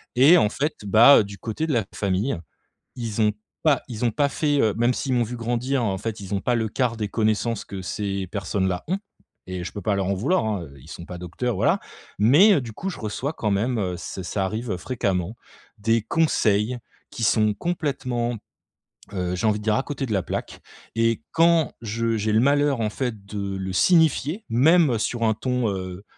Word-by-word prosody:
Et 145 +8 +7
en 105 - +3
fait, 150 +6 -2
bah, 110 +4 +7
du 100 0 -10
côté 115 +8 -3
de 155 - -1
la 115 - +2
famille, 100 +4 0 0.6
ils 115 -3 -3
ont 105 0 +4 0.3
pas 150 -4 +3
ils 120 -1 -6
ont 120 - +4
pas 145 +3 +1
fait, 145 -1 0
heu 110 -5 +3
même 120 +2 +2
s'ils 130 -2 -2
m'ont 120 - +2
vu 120 +2 -5
grandir, 120 +3 -1
en 100 -4 0
fait, 110 -1 -4
ils 95 0 -6
ont 100 - 0
pas 125 - +1
le 110 -2 -1
quart 120 0 -1
des 105 -2 -2
connaissances 110 +1 0
que 95 -1 -7
ces 100 0 -3
personnes-là 95 -2 -2
ont. 185 - 0 0.5
Et 90 -1 -4
je - - -5
peux 100 - -7
pas 105 +2 0
leur 95 -1 -1
en 100 - 0
vouloir, 150 - +1
hein, 105 -5 -2
heu, 70 -3 -12
ils 75 - -16
sont 85 - -8
pas 90 0 -8
docteurs, 100 +8 -3
voilà. - - +2 0.4
Mais, 145 - +6
heu, 145 - +1
du 115 -3 -8
coup, 195 - -4
je 185 - -7
reçois 115 +7 -3
quand 105 -8 -2
même, 115 +5 0
heu 90 -4 -1
c'est 95 - -6
ça 95 +2 -2
arrive 110 +1 -3
fréquemment, 95 -2 -2 0.4
des 115 +2 +1
conseils 115 -5 +1 0.3
qui 115 - -5
sont 110 -1 +3
complètement, 130 -6 -2 0.8
heu, 90 -2 -2
j'ai 110 - -1
envie 105 - +1
de - - -10
dire, 110 -1 +2
à - - +1
côté 140 -2 -4
de 110 - -4
la 95 - +1
plaque. - - -5 0.4
Et 115 0 +1
quand 165 -3 +4
je 115 +1 -1
j'ai 110 0 -1
le 110 - +4
malheur, 140 -1 +2
en 110 -1 0
fait, 110 -5 -4
de 100 -1 -4
le 95 0 -4
signifier, 160 - +3
même 140 +2 +4
sur 115 +1 -1
un 110 -1 +3
ton, 125 -1 -1
heu, 95 0 -5
115 Hz, 215 wpm, -24 LUFS, 100-130 Hz, 0.8 s, Et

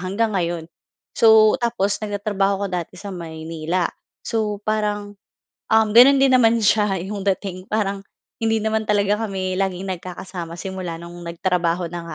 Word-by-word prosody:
hanggang 200 +5 -1
ngayon. 170 -3 -1 0.5
So, 220 -1 +5
tapos 230 -4 0
nagtatrabaho 205 -1 -1
ako - - 0
dati 180 0 -4
sa 200 +2 -7
Maynila. 165 0 -3 0.4
So, 210 -2 -2
parang, 210 -1 -1 0.6
um, 220 0 +4
gano'n 250 +5 +8
din 270 -1 +4
naman 235 -2 +5
siya 210 -2 +3
'yong 200 +1 -5 0.2
dating. 185 -1 -8
Parang 200 -2 -1 0.4
hindi 225 -1 +1
naman 220 0 -1
talaga 205 0 +2
kami 190 -1 -3
laging 190 0 -2
nagkakasama 180 -1 -7
simula 185 -2 -5
no'ng 170 +1 -10
nagtrabaho 175 0 -1
na 170 -1 -6
195 Hz, 145 wpm, -21 LUFS, 180-215 Hz, 0.6 s, gano'n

